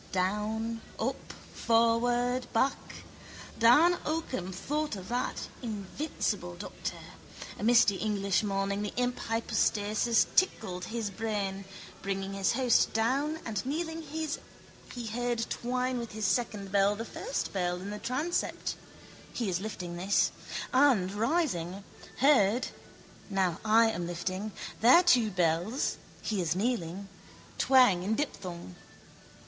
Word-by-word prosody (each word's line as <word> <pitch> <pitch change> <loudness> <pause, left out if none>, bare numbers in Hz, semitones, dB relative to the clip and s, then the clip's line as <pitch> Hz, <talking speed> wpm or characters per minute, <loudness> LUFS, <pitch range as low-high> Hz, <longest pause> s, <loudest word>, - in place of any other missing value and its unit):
Down, 215 +4 -1 0.2
up, - - -3 0.2
forward, 240 +2 +2
back. 260 +4 -1 0.6
Dan 300 +10 +6
Occam 285 - -3
thought 295 +8 -2
of 185 -2 -9
that, 245 +1 -2
invincible 205 - -3
doctor. 180 - -6 0.6
A - - -5
misty 225 -4 +5
English 200 -2 +1
morning 200 -1 -1
the 210 - -4
imp 250 0 0
hypostasis 225 0 +1
tickled 180 - +1
his 225 -3 -3
brain. 195 -2 -3 0.4
Bringing 195 0 -3
his 195 +3 +1
host 250 -1 +3
down 275 +8 0
and 215 -4 -2
kneeling 320 +4 -3
he 300 -5 -7
heard 235 +1 -1
twine 250 +1 -1
with 235 -2 -6
his 215 -1 -2
second 205 -3 -1
bell 200 +1 +3
the 225 +2 -5
first 485 - -4
bell 180 -2 0
in 190 +3 -6
the 210 - -5
transept 295 +10 -1 0.6
(he 230 -5 -2
is 180 0 -1
lifting 180 -5 -5
his) 195 +3 +2 0.4
and, 255 -9 +4
rising, 205 - -1 0.4
heard 250 -5 +4 0.6
(now 190 -4 0
I 225 +1 +5
am 175 -4 -3
lifting) 185 +4 -3 0.3
their 255 +10 +7
two 245 -11 +5
bells 180 - 0 0.3
(he 210 -4 -1
is 165 -1 0
kneeling) 195 -3 -2 0.5
twang 250 -9 +5
in 205 +4 0
diphthong. 180 - -4
220 Hz, 120 wpm, -30 LUFS, 195-250 Hz, 0.6 s, their